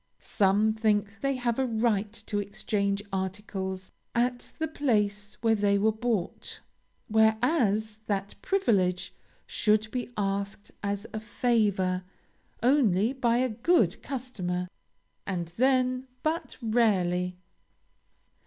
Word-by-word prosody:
Some 210 +2 +2
think 210 -1 0
they 275 0 +1
have 245 -1 -1
a 265 - +2
right 220 -3 +1
to 205 -2 -1
exchange 200 0 -1
articles 190 0 -3 0.2
at 245 +1 0
the 320 - -1
place 210 -9 0
where 225 -1 +4
they 205 -2 +3
were 215 +2 +3
bought; 220 -4 -3 0.5
whereas 220 -1 +2
that 200 -1 -1
privilege 195 - +1 0.3
should 215 0 +1
be 250 -1 -3
asked 200 0 -2
as 200 +1 -2
a 220 - -2
favor, 205 -5 +1 0.6
only 240 -4 +3
by 240 -3 +2
a 255 +1 +2
good 225 - +2
customer, 195 -10 -3 0.6
and 175 -4 -2
then 255 0 +2 0.2
but 320 +2 -2
rarely. 180 -6 +2
215 Hz, 110 wpm, -28 LUFS, 200-245 Hz, 0.6 s, where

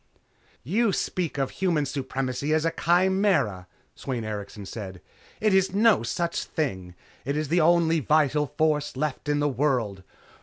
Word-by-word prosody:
"You 205 - +1
speak 175 -5 -2
of 135 -1 -1
Human 170 -6 0
Supremacy 135 +1 -2
as 160 0 0
a 165 - +2
chimera," 175 - +1 0.3
Sweyn 125 -4 -4
Erikson 105 -1 -6
said, 95 -3 -7 0.4
"It 215 -2 +2
is 190 0 +2
no 220 0 +4
such 170 +9 -2
thing. 95 - -3 0.3
It 140 +3 -2
is 155 -2 -2
the 170 +2 +3
only 165 0 +4
vital 150 0 +2
force 150 -1 0
left 150 0 -3
in 145 0 +1
the 145 - +2
world. 125 -8 0
150 Hz, 150 wpm, -26 LUFS, 125-170 Hz, 0.4 s, no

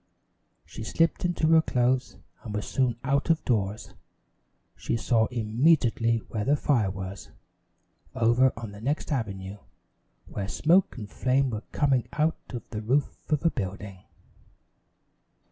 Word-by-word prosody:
She 110 - -8
slipped 165 +10 +1
into 175 -2 0
her 160 0 +6
clothes, 125 -3 0 0.2
and 105 -3 -6
was 105 - -3
soon 125 -3 +1
out 140 +3 0
of 165 -1 +2
doors. 105 -3 -1 0.8
She - - -2
saw 115 -1 +2
immediately 115 0 +2
where 105 -2 -3
the 140 +7 +3
fire 120 -9 +1
was 95 0 -7 0.9
over 125 +2 +4
on 115 -2 -6
the 100 +1 -11
next 145 +7 -2
avenue, 100 -6 -3 0.7
where 100 -1 -5
smoke 170 - +2
and 105 -4 -6
flame 130 +4 +1
were 110 -2 -3
coming 135 -5 +1
out 155 +2 +1
of 120 -3 -7
the 105 - -4
roof 130 +7 0 0.2
of 150 +2 +1
a 165 - +4
building. 100 -3 -5
120 Hz, 140 wpm, -27 LUFS, 105-140 Hz, 0.9 s, her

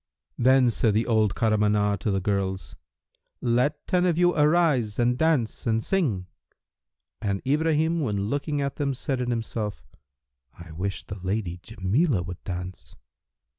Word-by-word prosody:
'" - - -51
Then 130 -2 +5
said 110 -2 +1
the 110 - +2
old 110 -4 +2
Kahramanah[FN#323] 105 -2 +2
to 105 - -2
the 95 -1 +1
girls, 95 -1 -2 0.6
"Let 125 +5 0
ten 180 -1 +1
of 170 -2 +1
you 175 0 +4
arise 150 -8 +2
and 120 0 +2
dance 140 -7 0
and 115 0 +1
sing." 135 - 0 1.0
And 100 -1 -1
Ibrahim 160 +3 +2
when 105 -9 -1
looking 145 +4 -1
at 140 -1 -3
them 140 -2 -1
said 130 0 -2
in 125 - -2
himself, 115 -3 -4 0.6
"I 85 -1 -11
wish 95 +5 -4
the 100 - -7
lady 90 -1 -3
Jamilah 110 - 0
would 90 -1 -8
dance." 90 0 -7
115 Hz, 150 wpm, -25 LUFS, 100-145 Hz, 1.0 s, Then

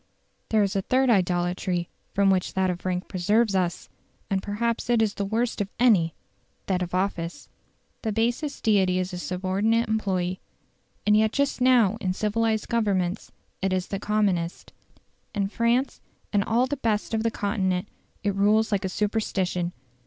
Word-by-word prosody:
There 215 -2 +3
is 200 0 -1
a 195 - +2
third 255 +5 +2
idolatry 175 -2 0 0.3
from 195 -1 +4
which 185 -1 0
that 190 -1 +2
of 175 0 -7
rank 180 0 -1
preserves 210 +4 +2
us, 185 -1 -1 0.4
and 190 -1 +1
perhaps 230 +4 -2
it 240 -1 +4
is 220 -2 +2
the 200 - -3
worst 225 +2 -1
of 200 - -2
any 195 -10 +4 0.5
that 185 -2 0
of 180 0 -3
office. 185 -3 -2 0.5
The 220 - -1
basest 240 +7 -1
deity 190 -4 +3
is 185 0 -2
a 180 - -4
subordinate 195 +6 0
employee, 185 -4 -1 0.7
and 210 - +5
yet 215 0 +3
just 280 -1 0
now 240 -5 +4
in 185 -1 0
civilised 220 +2 0
Governments 200 -5 0 0.3
it 190 0 0
is 185 -1 -1
the 195 - -3
commonest. 195 -5 -1 0.6
In 200 -1 0
France 235 +5 0 0.3
and 205 -1 +3
all 235 +4 +2
the 285 +2 -3
best 225 -4 -1
of 220 - +1
the 230 - +1
Continent 200 -3 -1 0.4
it 205 -1 +1
rules 215 +3 +3
like 200 -1 +1
a 190 - -1
superstition. 190 -4 -1
200 Hz, 165 wpm, -25 LUFS, 185-225 Hz, 0.7 s, and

